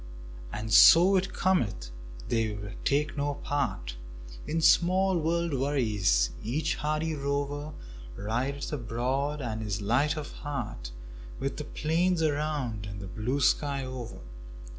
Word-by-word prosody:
And 110 +1 -4
so 180 +4 +8
it 190 0 +1
cometh 105 - 0 0.4
they 110 -2 0 0.3
take 150 +2 +1
no 145 0 -1
part - - -3 0.5
In 165 - 0
small 180 +3 +4
world 170 0 0
worries; 110 - +1
each 135 +8 -1
hardy 155 +2 -1
rover 145 +1 -2 0.4
Rideth 130 +8 -2
abroad 135 +4 -2
and 110 -2 -3
is 105 0 -2
light 130 +9 +1
of 150 -1 -5
heart, 120 - -5 0.5
With 135 - -3
the 150 - -5
plains 165 +3 0
around 145 -8 -1
and 100 -1 -7
the 100 - -7
blue 120 +8 -2
sky 140 0 +1
over. 130 -3 -7
140 Hz, 125 wpm, -28 LUFS, 110-155 Hz, 0.5 s, so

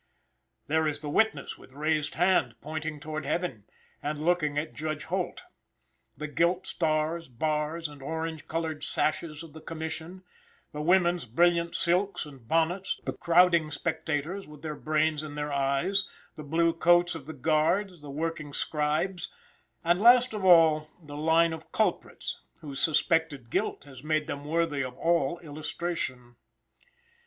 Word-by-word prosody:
There 160 +1 +2
is 145 -1 -2
the 150 -2 -4
witness 220 -7 +1
with - - -16
raised 150 +1 0
hand, 180 +3 +3
pointing 155 0 -5
toward 155 +1 -5
heaven, 140 - -2 0.4
and 150 +1 -2
looking 160 -4 +2
at 155 +2 -2
Judge 155 -1 -3
Holt. 185 - -3 0.7
The 155 - -4
gilt 170 +4 +1
stars, 160 +1 0
bars, 155 +5 -1
and 145 -2 -13
orange 160 +2 -4
colored 160 -1 -3
sashes 155 0 -1
of 160 -3 -12
the 160 - -10
commission; 165 +3 -6 0.5
the 150 - -5
women's 175 -2 +3
brilliant 170 +6 +2
silks 180 +2 +1
and 135 -6 -13
bonnets; 165 +6 +1
the - - -2
crowding 170 -2 +4
spectators, 160 +3 -2
with 150 0 -13
their 155 -1 -3
brains 155 0 +1
in 150 -1 -7
their 150 -1 -3
eyes; 140 +8 +1 0.3
the - - -9
blue 165 +3 +2
coats 175 +1 +4
of 155 -4 -8
the - - -5
guards; 160 +6 +1
the 145 - -9
working 155 0 -3
scribes; 155 +6 -1 0.5
and 175 +2 +3
last 245 +1 +7
of 210 -2 -4
all 160 -4 +6
the 150 -4 -10
line 160 +2 +3
of 160 - -9
culprits, - - -1 0.2
whose 140 -3 -5
suspected 155 -5 +1
guilt - - -1
has 135 -2 -13
made 155 0 +1
them 145 0 -5
worthy 160 -3 0
of 130 -1 -6
all 170 -2 +1
illustration. 150 -5 -4
160 Hz, 150 wpm, -28 LUFS, 150-170 Hz, 0.7 s, last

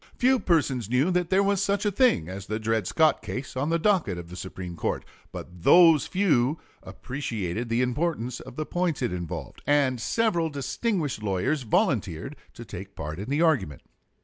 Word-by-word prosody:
Few 260 +1 +3
persons 135 - +1
knew 130 +9 +2
there 180 +2 +2
was 200 -1 +1
such 200 +1 0
a 205 - +2
thing 200 - +3
as 95 +1 -7
the 110 - -2
Dred 110 -3 -1
Scott 155 -1 +3
case 130 +1 -6
on 140 +4 -1
the 165 - +2
docket 170 - +1
of 85 -1 -8
the 90 - -9
Supreme 90 -1 -7
Court; - - -2 0.3
but 90 -1 -9
those 165 - +6
few 160 -7 +2 0.2
appreciated 115 -5 -4
the 115 +2 +2
importance 125 -2 -2
of - - -11
the 155 - -3
points 175 -6 -1
it 120 - -1
involved, 85 -5 -6
and 140 -4 +2
several 175 - +1
distinguished 150 - -2
lawyers 105 +9 0
volunteered 120 - 0 0.2
to 120 - -9
take 100 0 -9
part 75 +2 -6
in 105 +5 -6
the 145 +4 +2
argument. 140 - +1
130 Hz, 175 wpm, -26 LUFS, -, 0.3 s, those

